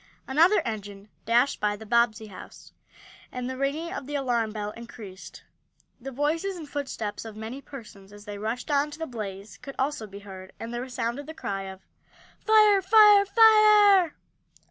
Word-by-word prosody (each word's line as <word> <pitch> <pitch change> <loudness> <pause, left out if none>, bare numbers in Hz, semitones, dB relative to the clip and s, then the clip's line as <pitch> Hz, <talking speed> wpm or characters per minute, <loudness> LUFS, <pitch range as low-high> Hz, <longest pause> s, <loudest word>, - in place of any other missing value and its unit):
Another 330 +10 +4
engine 205 -2 -7 0.2
dashed 240 +4 +2
by 210 0 0
the 220 +2 -11
Bobbsey 230 -1 +1
house, 190 - -13 0.6
and 250 0 -5
the 260 - -4
ringing 285 +6 -3
of 270 - -6
the 290 - -5
alarm 240 -5 -1
bell 210 -1 -5
increased. 215 -4 -11 0.6
The 265 +2 -7
voices 320 +8 -2
and 315 -3 -9
footsteps 265 -8 -5
of 225 -2 -9
many 225 +5 -7
persons, 210 -8 -12
as 205 0 -14
they 205 -1 -7
rushed 230 +7 -4
on 285 +1 +2
to 295 - -10
the 325 - -4
blaze, 205 -5 -8
could 275 - -9
also 265 -5 -2
be 200 0 -11
heard, 190 -2 -11
and 230 +1 -7
there 240 - -3
resounded 250 +2 -4
the 315 - -9
cry 195 -9 -4
of: 190 0 -12 0.5
"Fire! 425 -2 +5
Fire! 410 0 +6
Fire!" 420 -5 +6
250 Hz, 170 wpm, -26 LUFS, 215-310 Hz, 0.6 s, Fire